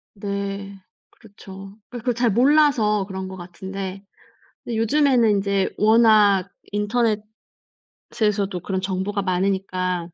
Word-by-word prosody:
네 200 0 -5 0.4
그렇죠. 195 -2 -13
그러니까 245 - -7
그걸 245 +2 -1
잘 240 -2 +1
몰라서 245 -5 +3
그런 190 -1 -5
것 190 0 -8
같은데 190 +2 -7 0.6
근데 230 - -4
요즘에는 235 -3 +3
이제 200 -1 0
워낙 215 -3 +4 1.4
인터넷에서도 200 -4 -2
그런 190 +1 -3
정보가 195 +2 -2
많으니까 185 -1 -1
200 Hz, 265 characters per minute, -22 LUFS, 190-220 Hz, 1.4 s, 워낙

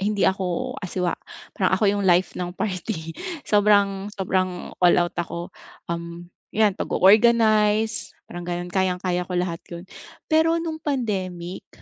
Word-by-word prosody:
hindi 205 0 +1
ako 190 +7 0
asiwa 180 -1 -1 0.4
parang - - +1
ako 220 - 0
yung 205 -1 -1
life 175 +1 +3
ng 175 0 -4
party 180 -4 -3 0.3
sobrang 200 -1 +3
sobrang 185 -2 -1
all 175 -1 +6
out 175 0 +1
ako 175 +1 -6 0.4
um 170 +1 -7 0.2
yan 215 -2 +4
pag-o-organize 215 +1 +3
parang 175 0 -8
ganon 175 0 -4
kayang 185 -1 +1
kaya 180 -1 -1
ko - - -5
lahat 175 -2 -1
yun. 170 +1 -8 0.4
Pero 320 +1 +3
nung 325 -1 -4
pandemic 190 - -3
190 Hz, 135 wpm, -23 LUFS, 175-215 Hz, 0.4 s, all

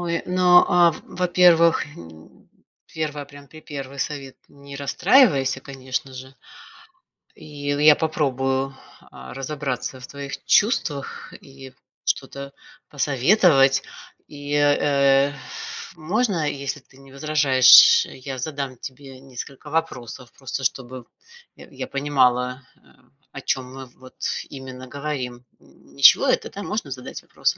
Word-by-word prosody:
Ой, 170 -1 -2
ну, 180 0 +1 0.3
а, 170 -1 +6
в 155 - -10 0.2
во-первых, 175 -2 +5
м, 80 - -15 0.5
1, 150 -2 -4
прям, 145 0 -15
припервый 140 -3 -9
совет: 140 -2 -5
не 140 0 -13
расстраивайся, 140 - +3
конечно 130 0 -6
же, 130 +1 -11 1.0
и - - -16 0.5
я - - -5
попробую, 135 -5 -1 0.5
а, 65 0 -11
разобраться 135 -2 -5
в 125 - -9
твоих 140 0 -8
чувствах 165 - 0
и 135 -1 -13 0.3
что-то 140 0 -3 0.4
посоветовать. 140 - +3 0.5
И, 145 0 -7
э, 140 -1 +3 0.6
можно, 190 +4 -1 0.3
если 140 +1 -4
ты 130 - -24
не 135 0 -17
возражаешь, 140 -3 +6
я 130 0 -8
задам 140 -2 -5
тебе 135 0 -11
несколько 135 +2 -10
вопросов, 130 -6 -4
просто 135 0 -6
чтобы 130 -1 -4 0.5
я - - -14 0.2
я - - -15
понимала, 135 -3 +1
э, - - -18 0.8
о - - -3
чём 130 - -1
мы 135 - -7 0.2
вот 130 - -14 0.4
именно 130 -1 -9
говорим. 130 -4 -5 0.5
Ничего - - +7
это, - - 0
да, 200 +1 -7
можно 210 -10 -4
задать 130 -1 -8
вопросы? - - -2
140 Hz, 120 wpm, -22 LUFS, 130-150 Hz, 1.0 s, Ничего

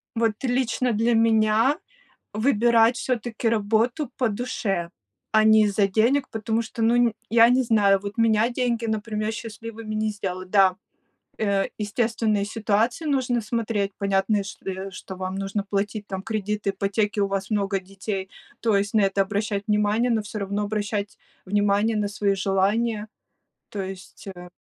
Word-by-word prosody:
Вот 225 -1 +2
лично 250 0 0
для 230 +3 +2
меня- 225 +4 +3 0.6
выбирать 235 0 +3
всё-таки 240 -2 -2
работу 225 +6 +1
по 250 - +1
душе, 200 -5 -2 0.4
а 215 0 +5
не 220 0 +6
из-за 205 -1 +2
денег, 235 +8 +2
потому 225 +1 -1
что, 230 +1 -6
ну 230 +1 +4
н 240 -2 +3 0.2
я 230 +1 +7
не 255 +1 +4
знаю, 205 -4 +3
вот 200 0 -6
меня 225 0 +3
деньги, 240 -2 -1
например, 215 0 -2
счастливыми 225 -1 -7
не 215 0 0
сделают. 185 -3 -5
Да, 190 -2 +4 0.6
э, 200 -2 +1
естественные 215 -1 0
ситуации 225 +7 0
нужно 255 -4 +1
смотреть, 220 -2 -1
понятные, 200 +1 +1
чт 200 - -10
э, 190 +1 -4
что 190 +1 -8
вам 185 0 -4
нужно 195 +1 -2
платить 205 +1 -2
там 190 -2 -5
кредиты, 210 -1 -2
ипотеки, 200 +2 -1
у 200 - +3
вас 195 -1 -3
много 200 -2 0
детей, 195 0 -5 0.3
то 225 -3 +2
есть 200 +1 -1
на 215 - +5
это 195 0 +2
обращать 205 +1 -2
внимание. 210 +3 +2
Но 225 -2 +1
всё 210 +1 -6
равно 200 +1 -2
обращать 205 -1 -3 0.3
внимание 205 +2 +2
на 210 -1 0
свои 200 0 0
желания, 210 +3 0 0.6
то 205 - -5
есть, 190 +1 -9
э. 180 0 -10
215 Hz, 155 wpm, -24 LUFS, 200-230 Hz, 0.6 s, я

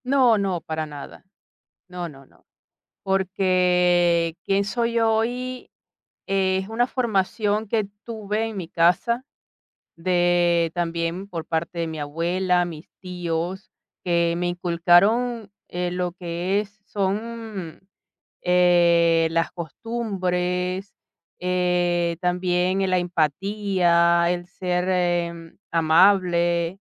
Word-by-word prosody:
No, 255 -4 +4
no, 190 -4 -1
para 160 0 -4
nada. 145 -2 -10 0.6
No, 180 -1 -5
no, 135 -3 -13
no. - - -27 0.6
Porque 180 -3 +2
quién 195 +1 +1
soy 235 +2 -1
hoy 240 +3 -1 0.6
es 190 0 0
una 230 +2 +1
formación 215 -3 -1
que 215 0 +1 0.2
tuve 220 -1 -3
en 220 -2 -6
mi 180 -4 -5
casa 180 +10 +2 0.7
de 175 -1 +2
también 170 +2 -2
por 170 -4 -5
parte 170 +1 -3
de 165 - -1
mi 160 -1 -6
abuela, 175 +4 0
mis 165 -2 -9
tíos, 180 0 -4 0.3
que 170 -1 +1
me 175 0 -1
inculcaron, 185 +7 +2 0.2
eh, 180 0 -2
lo 180 0 -2
que 180 +2 -2
es 210 0 -10
son, 210 -2 -4 0.6
eh, 170 -2 +4
las 165 0 0
costumbres, 180 - -3 0.5
eh, 175 -1 0
también 180 +1 +1
la 185 0 +2
empatía, 175 0 +2
el 175 0 -2
ser, 180 -1 -2
eh, 175 -2 -1 0.2
amable, 170 +1 +3
180 Hz, 105 wpm, -23 LUFS, 170-195 Hz, 0.7 s, No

